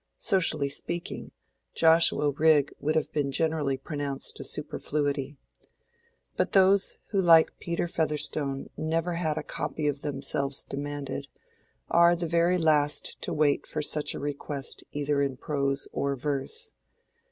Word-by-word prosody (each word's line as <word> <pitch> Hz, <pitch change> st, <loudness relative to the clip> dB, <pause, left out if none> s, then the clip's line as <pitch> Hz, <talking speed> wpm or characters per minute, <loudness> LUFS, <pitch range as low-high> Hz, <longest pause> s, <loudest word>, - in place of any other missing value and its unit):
Socially 155 Hz, -7 st, +2 dB
speaking, 170 Hz, +4 st, -4 dB, 0.4 s
Joshua 165 Hz, -2 st, +4 dB
Rigg 150 Hz, -1 st, +3 dB
would 155 Hz, +2 st, -1 dB
have 155 Hz, -, 0 dB
been 145 Hz, -2 st, 0 dB
generally 150 Hz, -3 st, 0 dB
pronounced 140 Hz, -1 st, -5 dB
a -, -, -5 dB
superfluity. 145 Hz, -1 st, -2 dB, 1.0 s
But -, -, -1 dB
those 195 Hz, +1 st, +4 dB
who 200 Hz, -3 st, +1 dB
like 165 Hz, -3 st, +5 dB
Peter 170 Hz, 0 st, -2 dB
Featherstone 150 Hz, -4 st, -2 dB
never 165 Hz, +2 st, -1 dB
had 160 Hz, -3 st, -1 dB
a -, -, -2 dB
copy 155 Hz, -, -4 dB
of 145 Hz, -1 st, -1 dB
themselves 140 Hz, -1 st, -2 dB
demanded, 140 Hz, -1 st, -5 dB, 0.6 s
are 170 Hz, 0 st, +5 dB
the 170 Hz, 0 st, -3 dB
very 170 Hz, +2 st, +2 dB
last 150 Hz, -3 st, +1 dB
to -, -, -3 dB
wait 150 Hz, -2 st, +1 dB
for 155 Hz, -, -3 dB
such 150 Hz, 0 st, +1 dB
a -, -, -5 dB
request 140 Hz, -1 st, -4 dB
either 145 Hz, 0 st, 0 dB
in 135 Hz, -2 st, -1 dB
prose 140 Hz, -1 st, -1 dB
or 140 Hz, 0 st, -1 dB
verse. 135 Hz, 0 st, -2 dB
150 Hz, 135 wpm, -27 LUFS, 140-165 Hz, 1.0 s, like